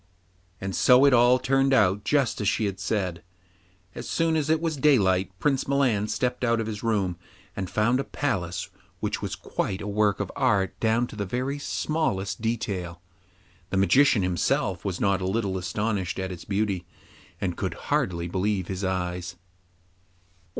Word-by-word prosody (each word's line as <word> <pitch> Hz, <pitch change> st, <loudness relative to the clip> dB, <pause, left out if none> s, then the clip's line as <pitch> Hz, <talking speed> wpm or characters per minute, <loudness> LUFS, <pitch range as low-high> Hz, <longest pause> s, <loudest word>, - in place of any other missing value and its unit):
And 95 Hz, 0 st, -4 dB
so 125 Hz, +2 st, +6 dB
it 140 Hz, -, +5 dB
all 120 Hz, +1 st, +6 dB
turned 135 Hz, +1 st, +2 dB
out 105 Hz, -3 st, +3 dB
just 140 Hz, -7 st, +1 dB
as 100 Hz, -, +2 dB
she 110 Hz, -, 0 dB
had 95 Hz, -2 st, -3 dB
said. 95 Hz, -3 st, -2 dB, 0.7 s
As -, -, -7 dB
soon 165 Hz, -1 st, +1 dB
as 155 Hz, -1 st, 0 dB
it 160 Hz, 0 st, +3 dB
was 165 Hz, -1 st, -1 dB
daylight 100 Hz, -10 st, +3 dB
Prince 135 Hz, +7 st, 0 dB
Milan 130 Hz, -7 st, +2 dB
stepped 125 Hz, +4 st, -1 dB
out 115 Hz, -1 st, +2 dB
of 115 Hz, -, -1 dB
his 105 Hz, -1 st, -5 dB
room, 100 Hz, -6 st, 0 dB, 0.4 s
and 95 Hz, -2 st, -4 dB
found 120 Hz, +4 st, +2 dB
a -, -, 0 dB
palace 95 Hz, -13 st, -3 dB, 0.3 s
which -, -, -2 dB
was -, -, -3 dB
quite 95 Hz, -, -3 dB
a -, -, -6 dB
work 105 Hz, 0 st, +1 dB
of 100 Hz, -2 st, -3 dB
art 105 Hz, -8 st, +2 dB
down 115 Hz, +2 st, +2 dB
to 120 Hz, -, -11 dB
the 105 Hz, -, -2 dB
very 130 Hz, +7 st, -2 dB
smallest 105 Hz, -12 st, -2 dB
detail. 100 Hz, -7 st, -3 dB, 0.7 s
The 95 Hz, -, -1 dB
Magician 120 Hz, +2 st, +4 dB
himself 90 Hz, -1 st, 0 dB
was 95 Hz, -2 st, -3 dB
not 100 Hz, -1 st, +1 dB
a 95 Hz, -, -1 dB
little 100 Hz, -1 st, -1 dB
astonished 95 Hz, 0 st, -2 dB
at 95 Hz, -1 st, -3 dB
its 90 Hz, -2 st, -8 dB
beauty, 100 Hz, -4 st, -1 dB, 0.5 s
and -, -, -2 dB
could -, -, -3 dB, 0.2 s
hardly 85 Hz, -1 st, 0 dB
believe 95 Hz, 0 st, -1 dB
his 95 Hz, 0 st, -4 dB
eyes. 90 Hz, -1 st, -2 dB
105 Hz, 170 wpm, -26 LUFS, 95-125 Hz, 0.7 s, so